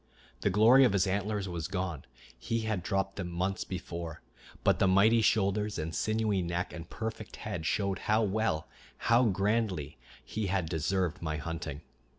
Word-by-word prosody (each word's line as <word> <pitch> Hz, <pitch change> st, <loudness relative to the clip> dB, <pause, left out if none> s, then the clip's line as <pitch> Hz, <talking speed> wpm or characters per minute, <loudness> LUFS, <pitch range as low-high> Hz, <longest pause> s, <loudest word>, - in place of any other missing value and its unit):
The 100 Hz, -, +1 dB
glory 110 Hz, +7 st, +7 dB
of 120 Hz, -6 st, +4 dB
his 100 Hz, -1 st, +3 dB
antlers 100 Hz, +1 st, -1 dB
was 85 Hz, -2 st, -3 dB
gone; 90 Hz, -5 st, -3 dB, 0.3 s
he 115 Hz, 0 st, -2 dB
had 110 Hz, -4 st, -1 dB
dropped 95 Hz, +2 st, -1 dB
them 90 Hz, -3 st, -3 dB
months 95 Hz, +3 st, -1 dB
before; 85 Hz, -3 st, -6 dB, 0.4 s
but -, -, +3 dB
the 100 Hz, -, +4 dB
mighty 105 Hz, +5 st, +5 dB
shoulders 105 Hz, 0 st, +2 dB
and 80 Hz, 0 st, -3 dB
sinewy 110 Hz, -1 st, +1 dB
neck 85 Hz, +1 st, -2 dB
and 85 Hz, -1 st, -8 dB
perfect 110 Hz, -1 st, -5 dB
head 90 Hz, -7 st, -4 dB
showed 100 Hz, +1 st, 0 dB
how 110 Hz, +1 st, +4 dB
well, 105 Hz, -6 st, 0 dB, 0.3 s
how 115 Hz, +2 st, +4 dB
grandly 100 Hz, -, 0 dB, 0.3 s
he 110 Hz, -2 st, -3 dB
had 95 Hz, -3 st, 0 dB
deserved 90 Hz, +2 st, -1 dB
my 80 Hz, -2 st, -2 dB
hunting. 80 Hz, -1 st, -5 dB
95 Hz, 165 wpm, -31 LUFS, 85-105 Hz, 0.4 s, glory